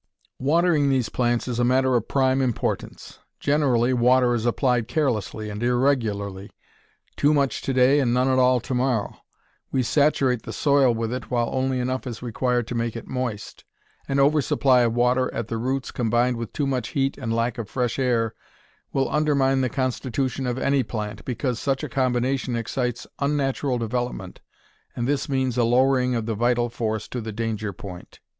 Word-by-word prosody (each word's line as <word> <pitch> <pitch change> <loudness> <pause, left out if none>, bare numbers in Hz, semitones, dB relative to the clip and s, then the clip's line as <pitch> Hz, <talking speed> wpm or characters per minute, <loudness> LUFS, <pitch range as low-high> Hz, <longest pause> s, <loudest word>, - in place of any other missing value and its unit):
Watering 155 +1 +2
these 130 -4 +1
plants 120 -1 0
is 120 -1 -2
a - - +3
matter 130 +1 +3
of 115 -2 0
prime 130 -1 +2
importance. 125 -4 -3 0.2
Generally 130 -4 +2
water 125 0 +4
is 120 0 -1
applied 120 -1 +1
carelessly 120 - -1
and 105 +1 -6
irregularly 115 -6 0 0.7
too 150 +1 +3
much 140 -2 0
to - - -2
day, 130 +2 +4
and 125 -4 +1
none 125 +2 +2
at 130 -1 +3
all 125 0 +4
to 130 - -5
morrow. 125 -4 0 0.6
We 130 - +1
saturate 135 -3 +2
the - - -7
soil 140 -3 +3
with 115 +1 -2
it 125 - -5
while 120 -2 0
only 130 0 0
enough 130 +1 -2
is 120 -1 -6
required 125 0 0
to - - -3
make 115 -1 -2
it 115 - -6
moist. 125 -5 -5 0.4
An 135 - -1
over 145 +2 +4
supply 130 -2 +3
of 115 -1 +1
water 125 +1 +2
at 115 - -3
the 115 - -2
roots, 130 +2 -2
combined 120 +1 +1
with 115 -1 -5
too 145 - -1
much 130 -2 -1
heat 135 -1 0
and 115 - -3
lack 115 +1 -1
of 110 - -5
fresh 125 -1 -1
air, 120 -4 +1 0.6
will 135 -1 +1
undermine 140 -3 +2
the 130 - 0
constitution 130 +1 -2
of 120 0 -2
any 140 +1 +2
plant, 105 -4 -5
because 125 -1 -2
such 135 +1 -1
a - - -2
combination 130 0 0
excites 120 +1 -2
unnatural 140 -2 0
development, 115 -5 -4 0.5
and 120 0 -2
this 145 0 -1
means 130 -2 0
a - - +4
lowering 125 +1 +3
of 115 -2 -2
the 115 - -2
vital 120 +2 +1
force 110 -2 -3
to 125 - -5
the 110 0 -5
danger 110 -1 -3
point. 90 -1 -11
125 Hz, 180 wpm, -24 LUFS, 115-135 Hz, 0.7 s, water